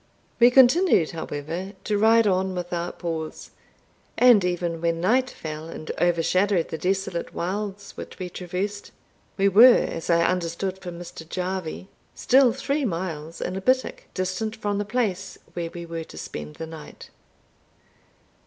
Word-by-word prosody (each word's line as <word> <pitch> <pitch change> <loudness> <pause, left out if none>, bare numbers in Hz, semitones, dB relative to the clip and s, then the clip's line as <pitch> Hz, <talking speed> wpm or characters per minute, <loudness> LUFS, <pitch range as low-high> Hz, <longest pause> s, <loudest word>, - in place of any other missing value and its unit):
We 240 +1 +8
continued, 260 - +5
however, 165 +4 -5
to 210 - 0
ride 225 +1 +5
on 190 -1 +1
without 175 -1 -4
pause 160 -3 -5 0.7
and 245 -6 +6
even 175 -2 -2
when 165 -1 0
night 250 +9 +2
fell 155 -3 -7
and 155 -1 -6
overshadowed 175 +2 +2
the 160 - -4
desolate 190 -2 -2
wilds 200 +2 -4
which - - -9
we 185 - -4
traversed, 185 +3 -4 0.5
we 195 0 +3
were, 230 +6 +8
as 165 - -5
I 170 0 +4
understood 180 +2 -1
from 175 -2 -7
Mr. 170 -2 -10
Jarvie, 185 -1 -4 0.3
still 260 -1 +5
three 285 +5 -1
miles 165 - -4
and 185 - -3
a 190 - -3
bittock 255 +5 0
distant 185 +4 -2
from 205 -2 -2
the 205 - -2
place 205 -4 -2 0.2
where 170 -1 -3
we 170 0 -8
were 165 -1 -5
to - - -13
spend 75 0 -7
the 160 - -6
night. 160 -1 -11
185 Hz, 150 wpm, -24 LUFS, 170-205 Hz, 0.7 s, We